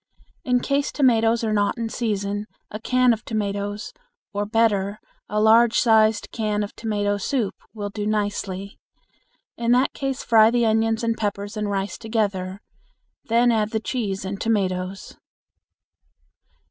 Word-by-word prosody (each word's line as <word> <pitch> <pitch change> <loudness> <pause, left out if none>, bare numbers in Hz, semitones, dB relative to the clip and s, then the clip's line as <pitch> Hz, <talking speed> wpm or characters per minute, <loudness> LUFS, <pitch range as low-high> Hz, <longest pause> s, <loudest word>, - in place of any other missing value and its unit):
In 250 -1 +2
case 280 +1 0
tomatoes 230 -4 +3
are 220 -1 0
not 205 +1 +1
in 230 -1 -2
season, 205 -2 -2 0.2
a 215 - -5
can 250 +1 +3
of 220 +1 -6
tomatoes, 205 -1 -3 0.4
or, 205 0 -2
better, 210 -2 +1 0.3
a 210 - 0
large 225 +2 +5
sized 220 -2 +3
can 210 -2 -1
of 205 - -7
tomato 205 -2 -1
soup 215 0 -1 0.2
will 205 -1 -4
do 210 0 -3
nicely. 205 -2 -3 0.8
In 235 0 +2
that 255 +2 +2
case 270 -2 -3
fry 220 -1 +6
the 240 0 +2
onions 225 +1 +1
and 230 0 +1
peppers 205 0 -3
and 210 -1 -2
rice 195 -1 -2
together. 200 -4 -2 0.6
Then 235 +1 +3
add 215 -2 +1
the 220 - -1
cheese 210 -5 -3
and 195 +1 -5
tomatoes. 190 -3 -2
215 Hz, 145 wpm, -23 LUFS, 205-230 Hz, 0.8 s, fry